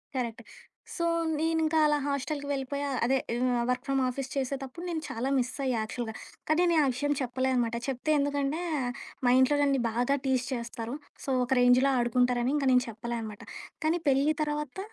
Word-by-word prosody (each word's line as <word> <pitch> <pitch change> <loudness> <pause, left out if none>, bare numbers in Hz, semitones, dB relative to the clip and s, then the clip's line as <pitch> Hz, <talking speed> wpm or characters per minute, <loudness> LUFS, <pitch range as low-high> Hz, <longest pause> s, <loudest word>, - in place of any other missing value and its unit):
కరెక్టే. 235 -2 -3 0.5
సో, 340 - -1 0.3
నేనింకా 320 0 +2
అలా 295 - +3
హాస్టలకి 285 +1 -2
వెళ్ళిపోయా, 280 +1 -2 0.2
అదే 265 +3 +3 0.2
ఆహ్, 245 0 +1
వర్క్ 250 0 0
ఫ్రమ్ 270 -1 +1
ఆఫీస్ 265 +1 -3
చేసేతప్పుడు 270 +3 -3
నేను 325 -2 -2
చాలా 240 +4 -2
మిసయ్యా 255 0 -1
యాక్చువల్‌గా. 220 0 -5 0.3
కానీ, 315 +3 +4
నేనా 315 -3 +4
విషయం 290 +4 0
చెప్పలేదనమాట. 250 -2 0
చెప్తే 270 +3 -1
ఎందుకంటే 285 +2 0 0.6
మా 245 - +5
ఇంట్లో 260 +3 +4
నన్ని 275 -2 +2
బాగా 245 +5 +1
టీజ్ 260 -2 +1
చేస్తారు. 235 0 -4 0.3
సో, - - -4 0.2
ఒక 250 - -13
రేంజ్‌లో 250 +2 +5
ఆడుకుంటారని 245 +2 +2 0.2
నేను 250 0 +5
చెప్పలే 235 +2 -4
అన్నమాట. 215 -2 -8 0.4
కానీ 330 +3 +2
పెళ్లి 275 +3 +3
తరవాత 300 +1 -2
265 Hz, 155 wpm, -29 LUFS, 245-285 Hz, 0.6 s, మా